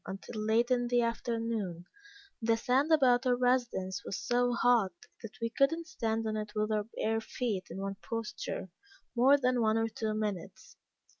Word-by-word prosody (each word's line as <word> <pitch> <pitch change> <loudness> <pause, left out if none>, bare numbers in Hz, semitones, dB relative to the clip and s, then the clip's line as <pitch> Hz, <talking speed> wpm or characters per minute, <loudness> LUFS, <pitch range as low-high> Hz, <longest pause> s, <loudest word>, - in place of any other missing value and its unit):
until 195 +3 -6
late 230 +3 +2
in 245 -1 +2
the 245 0 +2
afternoon, 230 -6 -2 0.6
the 225 0 +2
sand 265 +6 +2
about 260 -5 +5
our 250 - +4
residence 240 -7 0
was 195 - -4
so 245 0 +1
hot 240 -5 +3 0.3
that 225 - -9
we 230 - 0
could 275 +4 +3
not 330 +1 -4
stand 225 -7 -2
on 215 0 -1
it 210 -1 -4
with 215 0 0
our 210 -1 0
bare 225 0 0
feet 220 -5 -3
in - - -6
one 195 0 -3
posture, 225 -4 -4 0.5
more 265 +4 +6
than 250 -2 +1
one 220 0 +3
or 225 0 +1
two 220 -1 -3
minutes. 210 -5 -4
230 Hz, 175 wpm, -31 LUFS, 215-245 Hz, 0.6 s, more